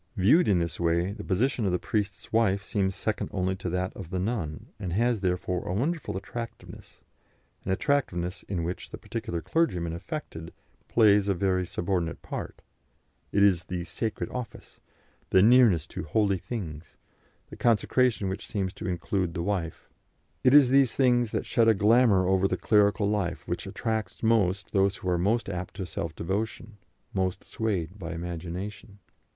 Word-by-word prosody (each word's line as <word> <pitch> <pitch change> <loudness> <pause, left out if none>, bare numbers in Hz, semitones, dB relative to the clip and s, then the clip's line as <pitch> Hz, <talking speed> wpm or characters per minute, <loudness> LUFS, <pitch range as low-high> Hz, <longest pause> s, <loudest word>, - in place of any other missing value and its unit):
Viewed 125 - +4
in 100 - +4
this 85 -1 -2
way, 85 +2 +1
the 105 - -7
position 115 +6 0
of - - +1
the 90 - +2
priest's 100 -1 -3
wife 100 -3 +2
seems 95 -2 -1
second 110 - -2
only 95 0 -1
to 95 -2 -4
that 90 +1 -2
of 90 -4 -8
the 95 - -3
nun, 90 -6 -3
and 90 -4 -4
has, 115 +3 +2
therefore, 90 -1 -1
a 90 - -1
wonderful 145 - -1
attractiveness, 115 +4 -8 0.6
an - - -6
attractiveness 95 -7 0
in 90 -4 -1
which 90 +2 -4
the - - -7
particular 85 -1 -5
clergyman 90 - 0
affected 85 - -6 0.4
plays 105 -3 +4
a 100 - +2
very 90 -1 0
subordinate 85 -1 -2
part; - - -6 0.7
it 100 - +3
is 90 -3 +3
the 90 -1 -4
"sacred 105 +5 -3
office," 125 -2 -7 0.5
the 95 - +5
nearness 110 -9 +6
to 95 - -6
"holy 100 +4 +1
things," 85 -8 -7 0.5
the - - -7
consecration 120 -1 +2
which 100 +4 -4
seems 95 -2 -2
to - - -6
include 90 0 -1
the 85 - -2
wife 90 -4 -3 0.6
it 130 +2 +6
is 140 -4 +8
these 135 -1 +4
things 120 -4 +3
that - - -2
shed 115 -2 +2
a 110 - +6
glamour 105 -2 +4
over 95 0 +3
the - - -1
clerical 105 -1 +3
life 100 -5 -2
which - - -3
attracts 110 -1 -3
most 100 -4 +2
those 100 -1 +2
who 95 - -4
are 90 -1 +1
most 110 +6 +1
apt 90 -1 -5
to 95 -2 -4
self 85 -2 -5
devotion, 110 +4 -3 0.4
most 95 0 -1
swayed 100 -4 -3
by 85 -1 -5
imagination. 90 +5 -6
95 Hz, 170 wpm, -27 LUFS, 90-110 Hz, 0.7 s, is